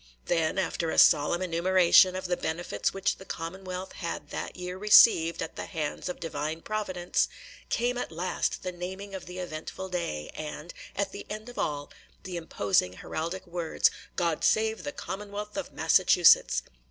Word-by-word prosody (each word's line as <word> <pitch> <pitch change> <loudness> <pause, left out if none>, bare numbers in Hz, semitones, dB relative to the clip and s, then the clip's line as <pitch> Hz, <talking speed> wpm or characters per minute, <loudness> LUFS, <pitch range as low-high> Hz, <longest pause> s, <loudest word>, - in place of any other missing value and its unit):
Then, 165 +1 +1
after 175 -3 -1
a - - -2
solemn 170 +5 +5
enumeration 185 +1 +5
of 185 - -4
the 180 0 +1
benefits 160 -12 -2
which 195 +1 -1
the - - -11
Commonwealth 185 +1 -6
had 170 - -6
that - - -5
year 180 0 -5
received 190 -4 +6
at - - -7
the - - -5
hands 155 +2 -3
of 180 - -5
Divine 160 0 -4
Providence, 185 -5 -1 0.4
came 245 +1 0
at - - -4
last 175 +3 -2
the 185 - -2
naming 190 +3 -7
of 190 - -7
the 180 +1 -8
eventful 180 +2 -6
day, 170 - -3
and, 155 +2 -7 0.2
at 200 -1 -1
the 200 - -8
end 215 +3 -6
of 245 - -8
all, 145 -1 -2 0.3
the 185 -1 -6
imposing 100 - +1
heraldic 165 - -5
words, 170 -2 +1 0.2
"God 170 -3 0
save 220 0 +2
the 290 - -2
Commonwealth 210 -2 -6
of - - -4
Massachusetts." - - +5
180 Hz, 165 wpm, -28 LUFS, 165-190 Hz, 0.4 s, received